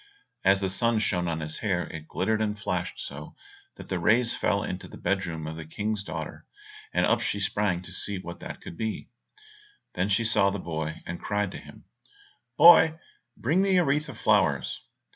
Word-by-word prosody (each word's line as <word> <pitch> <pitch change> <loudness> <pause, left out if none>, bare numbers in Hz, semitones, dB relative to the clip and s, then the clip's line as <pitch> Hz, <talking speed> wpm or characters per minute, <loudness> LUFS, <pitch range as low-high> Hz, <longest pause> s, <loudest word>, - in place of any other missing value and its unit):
As 95 +1 +4
the 95 - 0
sun 115 +4 +2
shone 90 -5 0
on 80 -1 -2
his 75 0 -5
hair 90 -5 0
it 80 -1 -8
glittered 110 +4 0
and 105 -1 -1
flashed 110 - -3
so - - -8 0.4
that - - -11
the 95 - -2
rays 115 +7 +3
fell - - +1
into - - -5
the - - -11
bed 95 +1 -1
room 80 -2 -5
of 80 +1 -5
the 80 - -6
King's 105 +6 -3
daughter, - - -7 0.4
and - - +2
up - - +2
she 100 - -1
sprang 100 -3 0
to 90 - -9
see 100 +2 -2
what 85 -2 -8
that - - -8
could - - -9
be. 110 -1 -4 0.8
Then 90 +3 0
she 105 +3 +2
saw 100 -3 +4
the 100 - -3
boy, 80 -3 -4
and 85 +1 -6
cried 105 -2 -1
to - - -7
him, - - -14 0.7
"Boy, 160 -2 +8 0.4
bring 155 +10 +2
me 195 -1 +3
a 175 - +4
wreath 150 +2 +1
of 125 - -9
flowers." 95 - +2
100 Hz, 200 wpm, -27 LUFS, 85-110 Hz, 0.8 s, Boy